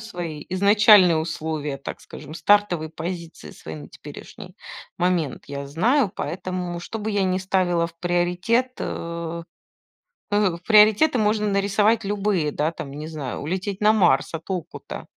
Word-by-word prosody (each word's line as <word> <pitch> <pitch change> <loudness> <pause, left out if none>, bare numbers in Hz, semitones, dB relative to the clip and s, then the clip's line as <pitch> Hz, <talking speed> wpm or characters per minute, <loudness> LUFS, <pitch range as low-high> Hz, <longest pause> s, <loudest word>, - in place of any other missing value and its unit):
свои 175 -8 -6
изначальные 200 -1 +6
условия, 155 -3 -3
так 140 - -7
скажем, 150 +1 -11
стартовые 175 -3 +2
позиции 165 - -7
свои 80 - -9
на 75 - -10
теперешний - - -12 0.4
момент 175 -5 0
я 140 0 -6
знаю. 220 - +2
Поэтому, 180 +1 -4
что 225 +6 -6
бы 215 +1 -3
я 205 -1 +1
не 185 0 0
ставила 185 -3 +1
в 170 - -14
приоритет, 180 +8 0
э 170 0 -5 0.9
э, 205 -4 +2
приоритеты 215 +6 +5
можно 210 0 +1
нарисовать 205 +3 +2
любые, 200 -6 0
да, 150 +3 -1
там, 150 - -7
не 150 +2 -7
знаю, 150 -5 -5
улететь 190 +5 -3
на 210 +1 +5
Марс. 170 -11 +2
А 165 - -3
толку-то? 180 0 -6
180 Hz, 140 wpm, -23 LUFS, 160-205 Hz, 0.9 s, изначальные